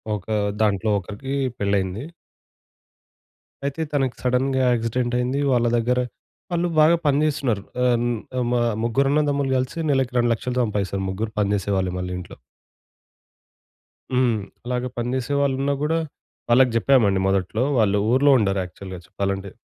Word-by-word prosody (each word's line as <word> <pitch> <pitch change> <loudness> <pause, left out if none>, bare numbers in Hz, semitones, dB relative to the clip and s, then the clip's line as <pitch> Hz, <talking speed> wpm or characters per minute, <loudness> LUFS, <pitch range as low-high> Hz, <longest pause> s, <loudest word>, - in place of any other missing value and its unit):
ఒక 100 - -8 0.4
దాంట్లో 105 +1 +1
ఒకరికి 105 +9 -6 0.2
పెళ్లయింది. 100 +1 0 1.6
అయితే 140 +3 -2
తనకి 135 -3 0
సడెన్‌గా 130 +1 +1
యాక్సిడెంట్ 120 +1 -1
అయింది. 125 +3 -1
వాళ్ళ 120 -2 +3
దగ్గర 125 +2 +1 0.5
వాళ్ళు 175 0 +1
బాగా 155 +2 +6
పని 140 -1 +3
జేస్తున్నారు 135 -9 0 0.2
ఆహ్, 125 -1 +3
న్ - - +1 0.3
ఆహ్, 125 - +1
మ - - +1 0.3
ముగ్గురన్నదమ్ములు 140 +3 +1
గలిసి 130 +5 -3
నెలకు 135 -2 +1
2,000,00 120 +1 0
సంపాదిస్తారు 100 -3 -2
ముగ్గురు 105 +4 -3
పని 100 -1 +1
జేసేవాళ్ళే 95 -2 -1
మళ్ళీ 90 0 -4
ఇంట్లో. 90 - -10 1.8
హ్మ్. 125 -3 +2 0.3
అలాగా 125 0 -2
పని 120 0 -2
జెసే 130 +2 -2
వాళ్ళున్న 140 0 +1
గూడా 160 +2 +1 0.5
వాళ్ళకి 125 +1 +5
జెప్పామండి 115 -5 +3
మొదట్లో 95 +4 0
వాళ్ళు 105 -3 +3
ఊర్లో 140 +3 +5
ఉండరు 100 -4 +1
యాక్చువల్‌గా 95 +1 -9
చెప్పాలంటే. 100 0 -3
120 Hz, 130 wpm, -23 LUFS, 100-135 Hz, 1.8 s, బాగా